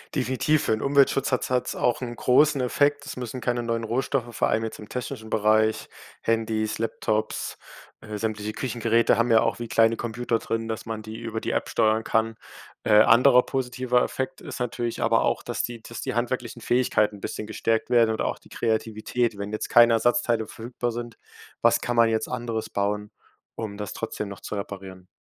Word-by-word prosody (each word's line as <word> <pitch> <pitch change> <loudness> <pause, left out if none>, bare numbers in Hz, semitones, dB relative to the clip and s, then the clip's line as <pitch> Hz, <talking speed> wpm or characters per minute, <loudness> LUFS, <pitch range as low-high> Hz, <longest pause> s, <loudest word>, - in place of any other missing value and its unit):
Definitiv, 140 +3 +1
für - - 0
'n 110 - +1
Umweltschutz 140 -1 +3
hat 125 - +2
es - - -4
hat 125 -1 +1
es - - -3
auch 125 - +1
'n 120 -2 -4
großen 140 +3 +4
Effekt. 145 +3 +1
Es - - -7
müssen 125 0 -5
keine 120 0 0
neuen 115 -1 -1
Rohstoffe, 120 +1 -1
vor - - +2
allem 110 - +1
jetzt 110 - -5
im 105 - -10
technischen 115 -3 -5
Bereich 110 0 +2 0.3
Handys, 110 -1 0
Laptops, 110 -1 -2 0.4
äh, 105 -1 -6
sämtliche 110 -1 -3
Küchengeräte 115 -1 +1
haben 115 +1 +2
ja 110 - +6
auch 115 0 0
wie 120 - -4
kleine 115 0 +3
Computer 120 0 -2
drin, 115 0 -3
dass 110 0 -4
man 110 -1 -4
die 110 +1 -8
über 115 -1 -4
die - - -2
App - - -1
steuern 110 0 +2
kann. 115 0 0 0.5
Äh, 105 - +3
anderer 125 +3 +6
positiver 125 -1 0
Effekt 130 +7 -3
ist 145 -6 -8
natürlich 120 -1 -2
aber - - +3
auch, - - 0
dass - - -2
die 120 -2 -5
dass 115 +1 -8
die - - -3
handwerklichen 120 -1 -2
Fähigkeiten 110 -4 +1
'n - - -17
bisschen 105 - -5
gestärkt 110 +1 -1
werden 115 -2 +4
oder 110 - -2
auch - - -3
die - - -20
Kreativität, 110 0 -1
wenn 100 +1 -5
jetzt 110 - -3
keine 120 -1 +7
Ersatzteile 115 -1 +2
verfügbar 120 +1 -4
sind- 120 -1 -6 0.4
was - - +4
kann 120 - -2
man 115 -1 +6
jetzt 110 0 -1
anderes 120 -3 -3
bauen, 105 +1 -2 0.4
um 110 -2 -5
das 105 -1 -5
trotzdem 105 -2 -4
noch 100 - -8
zu - - -6
reparieren? 95 -2 -7
115 Hz, 200 wpm, -25 LUFS, 110-125 Hz, 0.5 s, keine